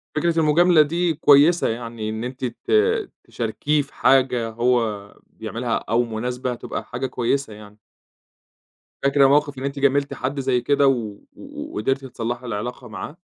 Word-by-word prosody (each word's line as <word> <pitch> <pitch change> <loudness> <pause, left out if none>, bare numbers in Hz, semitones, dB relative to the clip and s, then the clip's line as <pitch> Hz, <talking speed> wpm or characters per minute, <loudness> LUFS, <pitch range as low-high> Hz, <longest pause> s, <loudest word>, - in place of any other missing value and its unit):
فكرة 165 +1 +1
المجاملة 160 +1 +5
دي 170 +3 +1
كويسة، 150 +3 +5
يعني 115 -1 -5
إن 110 +1 -4
أنتِ 130 +1 -5
ت 120 - -6 0.5
تشاركيه 145 +6 -1
في 140 - -12
حاجة 125 -4 +2
هو 115 -3 -1
بيعملها - - -4
أو 115 +3 0
مناسبة 125 +2 -3
تبقى - - -6
حاجة 125 +2 -4
كويسة 130 0 -1
يعني. 105 0 -14 1.3
فاكرة 140 0 +4
موقِف 145 0 +2
إن 130 - -6
أنتِ 140 0 -3
جاملتِ 140 0 +1
حد 135 +2 -3
زي 130 -2 +1
كده 140 +2 +3
و 110 -6 0 0.2
و - - -9
قدِرتِ 135 +5 -1
تصلّحي 120 0 -5
العلاقة 120 +3 -5
معاه؟ 125 - -8
130 Hz, 150 wpm, -22 LUFS, 115-140 Hz, 1.3 s, المجاملة